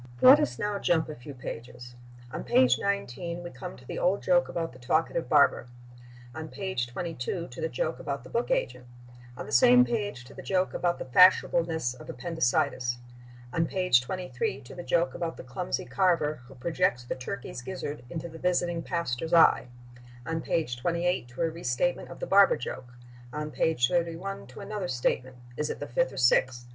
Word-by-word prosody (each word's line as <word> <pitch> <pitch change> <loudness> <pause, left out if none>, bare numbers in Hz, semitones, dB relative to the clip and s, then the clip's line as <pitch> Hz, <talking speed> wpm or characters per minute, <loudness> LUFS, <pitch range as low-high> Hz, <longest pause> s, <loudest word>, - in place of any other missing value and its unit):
Let 270 +3 +9
us 300 - -1
now 205 -1 -2
jump 160 -4 +1
a 155 - -6
few 135 +4 -10
pages. 120 0 -8 0.4
On - - -5
page 125 -1 +4
19 175 -3 -3
we 175 - -7
come 125 - -8
to 125 - -16
the - - -5
old 190 +3 +1
joke 265 -1 +3
about 165 -5 -3
the 125 - -14
talkative 160 +6 0
barber; 140 -4 +4 0.7
on 160 0 -6
page 190 -10 -3
22 165 +4 -4
to - - -9
the 485 - -1
joke - - -2
about - - -4
the - - -12
book 475 +1 -1
agent; - - -1 0.5
on - - -6
the - - -9
same 250 - +7
page 205 - -3
to - - -13
the - - -9
joke 185 -1 0
about 175 -1 0
the - - -6
fashionableness 165 -2 +4
of 125 - -13
appendicitis; 130 -3 0 0.6
on 165 0 +1
page 180 -10 +3
23 130 -4 -3
to 125 - -12
the 175 - -7
joke 170 0 +1
about 165 -1 -4
the - - -8
clumsy 135 +9 -3
carver 165 -7 +1
who 135 - -14
projects 145 -2 0
the 120 - -3
turkey's 125 -1 -6
gizzard 145 -2 -6
into 165 +3 -5
the 165 -1 -11
visiting 175 -1 0
pastor's 165 -1 -1
eye; 165 - +6 0.6
on 165 0 -2
page 140 -9 -1
28 170 -2 0
to 125 +4 -8
a 165 - +2
restatement 165 +1 -1
of 175 - -10
the - - -3
barber 195 0 +6
joke; 125 0 -7 0.3
on 150 +2 -4
page 135 -8 +2
31 175 +4 -2
to - - -11
another 200 -2 -4
statement—is 125 +1 -2
it - - -4
the - - -4
fifth - - 0
or - - -10
sixth? 120 0 +3
165 Hz, 185 wpm, -28 LUFS, 125-180 Hz, 0.7 s, Let